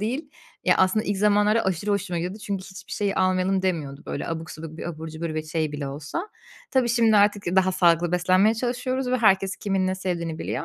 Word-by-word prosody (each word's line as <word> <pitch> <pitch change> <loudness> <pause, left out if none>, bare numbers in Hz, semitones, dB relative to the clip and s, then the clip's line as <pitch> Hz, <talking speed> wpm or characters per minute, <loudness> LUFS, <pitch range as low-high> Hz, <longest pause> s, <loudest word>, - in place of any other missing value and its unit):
değil. 250 +9 -3 0.3
Ya, - - +5
aslında 190 +3 +3
ilk 205 - -1
zamanlarda 210 +2 +3
aşırı 190 +2 -1
hoşuma 200 -3 -1
gidiyordu 180 +5 -4
çünkü 195 -2 -3
hiçbir 190 0 -11
şeyi 200 -2 -1
almayalım 185 0 +1
demiyordu, 150 -7 -2
böyle, - - -4
abuk 165 -1 -4
subuk 160 +1 -8
bir - - -4
abur 160 -1 -6
cubur 160 0 -5
ve 155 - -2
şey 155 -1 -2
bile 145 -1 -4
olsa. 150 - -5 0.4
Tabii, 255 -2 +2
şimdi 230 -2 +4
artık 205 -1 +3
daha 185 0 +4
sağlıklı 170 -1 +3
beslenmeye 185 +4 +3
çalışıyoruz 250 +2 -2
ve 255 - +3
herkes 195 -4 +3
kimin 195 -2 0
ne 185 - 0
sevdiğini 170 -4 -3
biliyor. - - -3
190 Hz, 205 wpm, -24 LUFS, 170-210 Hz, 0.4 s, Ya